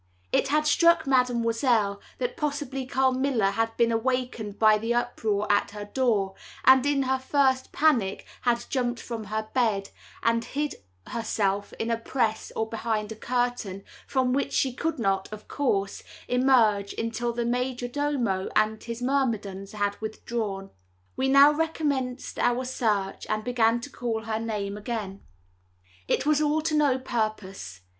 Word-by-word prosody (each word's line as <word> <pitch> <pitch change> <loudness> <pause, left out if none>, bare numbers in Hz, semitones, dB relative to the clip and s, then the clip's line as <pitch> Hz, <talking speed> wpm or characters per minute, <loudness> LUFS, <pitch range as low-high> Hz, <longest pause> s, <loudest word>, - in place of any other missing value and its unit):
It - - +2
had 305 +2 +2
struck 335 +1 +4
Mademoiselle 235 -5 +2 0.2
that 245 -1 -2
possibly 285 -4 -3
Carmilla 260 -5 +2
had 225 +2 -1
been 230 -1 +2
wakened 245 -5 -2
by 215 -1 +5
the 230 +2 -1
uproar 220 -4 0
at 205 - +2
her 210 0 -7
door, 205 -4 +1 0.3
and 260 0 +7
in 285 -1 +2
her 265 0 0
first 260 -1 +1
panic 240 -11 +2 0.2
had 240 -1 +1
jumped 245 -2 -1
from 230 -3 -6
her 215 +1 -3
bed, 215 -6 +1 0.3
and 230 0 +2
hid 295 +4 -2 0.4
herself 205 -3 -1
in 225 +1 -2
a 230 - +1
press, 230 -2 -1
or 220 - -1
behind 220 -1 -2
a - - -5
curtain, 245 -4 -2 0.2
from 260 -2 +1
which 275 +1 -1
she 260 -2 +1
could 325 +5 -2
not, 195 -4 0
of 215 0 -9
course, 200 -8 -1 0.3
emerge 235 -6 +3
until 230 +1 -1
the 235 0 -2
majordomo 245 -3 -1
and 215 0 +2
his 235 +1 -5
myrmidons 220 -8 -1
had 205 -1 -2
withdrawn. 215 -3 -4 0.4
We 265 - 0
now 275 +2 +7
recommenced 290 -5 -2
our 245 +1 +1
search, 210 -6 -1
and 215 0 -1
began 235 -1 +2
to 285 - -7
call 225 -2 -3
her 220 0 -2
name 210 -3 -3
again. 210 -3 -5 0.9
It - - +1
was 305 0 +3
all 305 +1 +2
to 320 0 -1
no 290 -4 +3
purpose. 215 - -4
235 Hz, 150 wpm, -26 LUFS, 215-260 Hz, 0.9 s, and